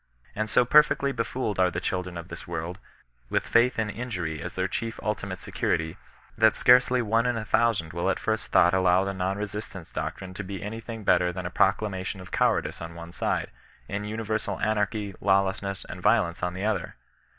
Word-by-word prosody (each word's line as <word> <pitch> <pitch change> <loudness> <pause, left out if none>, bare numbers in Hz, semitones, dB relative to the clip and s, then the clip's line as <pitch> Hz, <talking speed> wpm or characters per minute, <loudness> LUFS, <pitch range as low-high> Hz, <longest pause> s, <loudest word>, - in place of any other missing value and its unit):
And 110 +1 -1
so 125 +3 +4
perfectly 140 0 +5
befooled 115 -3 -2
are 90 -1 +5
the 90 - -3
children 90 -1 -3
of 85 +1 -8
this 85 - -9
world, 85 +1 -4 0.5
with/aiVA 120 +2 +3
in 110 -2 0
injury 90 -10 -4
as - - -6
their - - 0
chief 115 -1 -4
ultimate 100 -3 -3
security, 80 0 -1 0.4
that 110 -1 +4
scarcely 125 0 +5
one 115 +2 +2
in 120 -1 0
a 110 - -4
thousand 100 -6 +1
will 85 0 0
at - - +1
first - - -2
thought 90 +1 +5
allow 95 0 +4
the 100 0 -2
non 95 +1 -1
resistance 105 -3 -6
doctrine 95 -1 -4
to 100 - -5
be 95 +1 -6
any 110 +3 -5
thing 115 -1 -7
better 90 -2 +3
than 90 0 -6
a 85 - -3
proclamation 95 -1 +1
of 95 0 -11
cowardice - - +1
on 85 0 -7
one 85 0 -9
side, - - -1 0.4
and 105 +1 -4
universal 110 0 -2
anarchy, 105 -1 0
lawlessness, 95 0 +1
and - - -8
violence 85 0 +2
on 90 0 -2
the 95 +2 -3
other. 110 - -1
100 Hz, 190 wpm, -27 LUFS, 90-110 Hz, 0.5 s, perfectly